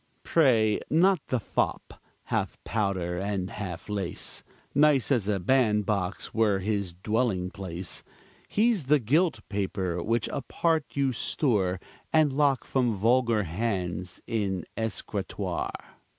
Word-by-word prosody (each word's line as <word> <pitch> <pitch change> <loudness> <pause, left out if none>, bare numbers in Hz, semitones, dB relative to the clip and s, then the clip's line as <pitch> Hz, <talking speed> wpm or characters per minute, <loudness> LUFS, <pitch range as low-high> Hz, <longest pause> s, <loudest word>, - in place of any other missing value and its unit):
Pray 115 -9 +4
not 180 +3 +4
the 130 - 0
fop, - - -2 0.2
half - - -2
powder 95 -5 -1
and 95 -1 -2
half 90 -5 -6
lace, 100 -4 -3 0.3
Nice 145 -2 +4
as 115 -7 +2
a 105 -2 +1
bandbox 105 -3 +1
were 110 -3 +3
his 100 -2 -2
dwelling 100 -2 0
place; 90 -3 -4 0.5
He's 215 - +2
the 150 +3 +5
gilt 145 - +2
paper, 95 -3 -2
which 115 +3 0
apart 160 +3 0
you 135 -2 +1
store, 100 - 0 0.3
And 155 -3 +4
lock 140 -2 +2
from 125 -3 +1
vulgar 115 +1 +2
hands 90 -1 -3
in 100 -5 -1
the - - -16 0.2
escritoire. 110 - -4
105 Hz, 120 wpm, -28 LUFS, 95-130 Hz, 0.5 s, the